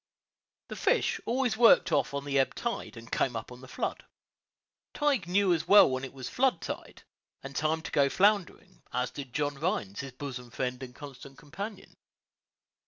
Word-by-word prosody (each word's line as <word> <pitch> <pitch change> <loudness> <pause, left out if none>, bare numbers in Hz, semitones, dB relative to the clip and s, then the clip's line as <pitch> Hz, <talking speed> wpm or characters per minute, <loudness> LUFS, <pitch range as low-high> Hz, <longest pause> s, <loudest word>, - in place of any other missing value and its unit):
The - - -5
fish - - +1
always 245 -2 +1
worked 225 -6 +6
off - - +2
on 140 0 -3
the 140 -1 +1
ebb 135 - +1
tide, 235 - -4
and 115 0 -11
came 125 - 0
up 115 - -5
on 125 0 -11
the 130 - -11
flood. - - -3 0.9
Tige 280 - +1
knew 190 0 +3
as 160 - -2
well 205 - +8
when 130 0 -2
it 135 - -5
was 130 -2 -7
flood 255 -8 +1
tide, - - -7 0.4
and 135 0 -8
time 155 +2 0
to - - -6
go 140 -1 +3
floundering, 195 0 +1
as 125 +1 -1
did 135 -3 -8
John 145 0 -2
Rhines, 105 - -2
his 135 -2 -6
bosom 125 -2 -7
friend 125 +1 -3
and 125 -1 -8
constant 140 -1 -11
companion. 195 +6 -8
145 Hz, 180 wpm, -29 LUFS, 130-195 Hz, 0.9 s, well